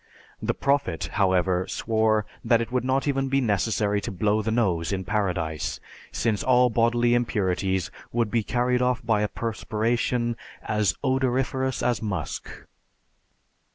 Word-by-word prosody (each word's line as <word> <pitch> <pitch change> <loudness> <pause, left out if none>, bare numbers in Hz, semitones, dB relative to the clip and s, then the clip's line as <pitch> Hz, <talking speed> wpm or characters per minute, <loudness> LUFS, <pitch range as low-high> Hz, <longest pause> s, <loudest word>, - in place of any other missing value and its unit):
The - - -1
Prophet, 140 - 0
however, 95 -2 +2
swore 110 -1 +1 0.2
that 115 0 +4
it 115 0 -3
would 125 -1 0
not 130 +2 0
even 135 -1 0
be 135 +1 +2
necessary 105 -2 +1
to - - -4
blow 105 +3 +1
the 110 - -2
nose 95 -8 +1
in 95 -1 -2
Paradise, 85 -6 -1 0.3
since 110 -3 0
all 125 -1 +4
bodily 120 +1 +3
impurities 95 -5 0 0.2
would 115 -3 0
be 115 - +2
carried 125 +3 0
off 125 -1 0
by 110 -2 +2
a 105 - +1
perspiration 115 +2 -1 0.3
"as 105 -6 +1
odoriferous 130 0 0
as 120 -2 +1
musk." 105 -4 -4
110 Hz, 140 wpm, -25 LUFS, 100-125 Hz, 0.3 s, that